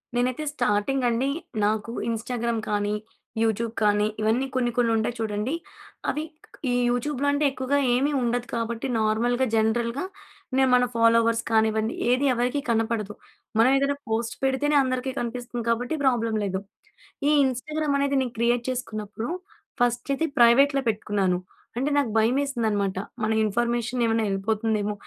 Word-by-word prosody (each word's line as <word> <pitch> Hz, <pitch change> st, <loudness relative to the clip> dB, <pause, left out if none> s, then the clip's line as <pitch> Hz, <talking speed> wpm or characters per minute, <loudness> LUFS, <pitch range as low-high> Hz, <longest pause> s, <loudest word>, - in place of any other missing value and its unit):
నేనైతే 250 Hz, +4 st, 0 dB
స్టార్టింగ్ 245 Hz, +4 st, 0 dB
అండి 240 Hz, +4 st, 0 dB, 0.4 s
నాకు 215 Hz, +2 st, -1 dB, 0.2 s
ఇన్‌స్టాగ్రామ్ 230 Hz, 0 st, -2 dB
కానీ, 205 Hz, 0 st, 0 dB, 0.5 s
యూట్యూబ్ 225 Hz, +1 st, 0 dB
కానీ 210 Hz, 0 st, +3 dB
ఇవన్నీ 230 Hz, +5 st, +1 dB
కొన్ని 240 Hz, -2 st, +1 dB
కొన్ని 235 Hz, -2 st, +3 dB
ఉంటాయి 225 Hz, +2 st, 0 dB
చూడండి. 215 Hz, +5 st, -2 dB, 0.6 s
అవి 300 Hz, -, -1 dB, 0.5 s
ఈ -, -, +1 dB, 0.2 s
యూట్యూబ్‌లో 275 Hz, +3 st, -1 dB
అంటే 285 Hz, +1 st, +1 dB
ఎక్కువగా 265 Hz, +1 st, -1 dB, 0.2 s
ఏమీ 280 Hz, +4 st, +1 dB
ఉండదు 245 Hz, 0 st, -1 dB
కాబట్టి 230 Hz, +2 st, -2 dB
నార్మల్‌గా 240 Hz, +4 st, +1 dB
జనరల్‌గా 235 Hz, +5 st, +1 dB, 0.5 s
నేను 265 Hz, -1 st, +4 dB
మన 250 Hz, 0 st, +4 dB
ఫాలోవర్స్ 230 Hz, 0 st, +3 dB
కానివ్వండి 220 Hz, 0 st, +2 dB, 0.2 s
ఏది 255 Hz, +3 st, +3 dB
ఎవరికీ 245 Hz, +4 st, 0 dB
కనపడదు. 225 Hz, -2 st, 0 dB, 0.5 s
మనం 245 Hz, +3 st, +6 dB
ఏదైనా 280 Hz, +1 st, +1 dB
పోస్ట్ 225 Hz, +1 st, -1 dB
పెడితేనే 270 Hz, +3 st, +1 dB
అందరికీ 255 Hz, 0 st, -2 dB
కనిపిస్తుంది 240 Hz, 0 st, -4 dB
కాబట్టి 245 Hz, +4 st, 0 dB
ప్రాబ్లమ్ 230 Hz, -4 st, +2 dB
లేదు. 190 Hz, -1 st, -1 dB, 0.7 s
ఈ -, -, +4 dB
ఇన్‌స్టాగ్రామ్ 285 Hz, +3 st, -1 dB
అనేది 280 Hz, 0 st, +1 dB
నేను 250 Hz, -2 st, -3 dB
క్రియేట్ 240 Hz, +1 st, +2 dB
చేసుకున్నప్పుడు 220 Hz, -3 st, -4 dB, 0.5 s
ఫస్ట్ 240 Hz, +2 st, +1 dB
అయితే 325 Hz, +4 st, 0 dB
ప్రైవేట్‌లో 275 Hz, +4 st, +5 dB
పెట్టుకున్నాను. 200 Hz, -4 st, 0 dB, 0.4 s
అంటే 270 Hz, +4 st, 0 dB
నాకు 280 Hz, -5 st, +2 dB
భయమేసింది 245 Hz, +2 st, +1 dB
అన్నమాట 200 Hz, -2 st, -1 dB, 0.3 s
మన 220 Hz, -, +1 dB
ఇన్ఫర్మేషన్ 240 Hz, +3 st, 0 dB
ఏమైనా 225 Hz, 0 st, +1 dB
ఎళ్ళిపోతుందేమో. 210 Hz, +1 st, 0 dB
235 Hz, 135 wpm, -25 LUFS, 220-255 Hz, 0.7 s, మనం